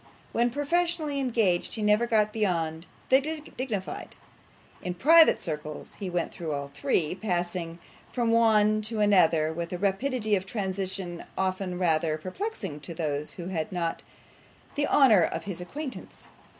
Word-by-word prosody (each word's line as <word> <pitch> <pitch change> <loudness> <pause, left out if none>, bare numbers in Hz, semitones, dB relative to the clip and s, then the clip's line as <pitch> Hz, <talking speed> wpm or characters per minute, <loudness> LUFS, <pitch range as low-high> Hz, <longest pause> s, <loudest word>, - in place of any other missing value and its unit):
When 240 +1 +2
professionally 305 +2 0
engaged 225 -9 +1
he 220 - -3
never 210 +3 +3
got 215 -2 +2
beyond 165 -6 -1 0.2
the 265 +1 +6 0.3
dignified; 225 -7 -4 0.7
in 180 -1 -4
private 320 - +6
circles 150 -2 -5
he 195 -3 -3
went 175 -1 -2
through 160 -3 -4
all 140 0 -4
three, 155 -1 0
passing 175 -3 -2 0.3
from 235 -2 0
one 215 -2 +4
to 215 +1 -2
another 165 -6 +4
with 170 +1 -4
a 180 - -2
rapidity 215 +3 0
of 190 -1 -3
transition 190 -4 -3
often 185 -1 -1
rather 160 -3 +1
perplexing 185 - -5
to 155 +3 -7
those 150 -2 -2
who 175 0 -7
had 165 -4 -3
not 170 -2 -2 0.7
the 290 0 0
honour 235 -10 +6
of 160 - -1
his 190 -3 -5
acquaintance. 280 - -7
190 Hz, 145 wpm, -27 LUFS, 170-230 Hz, 0.7 s, the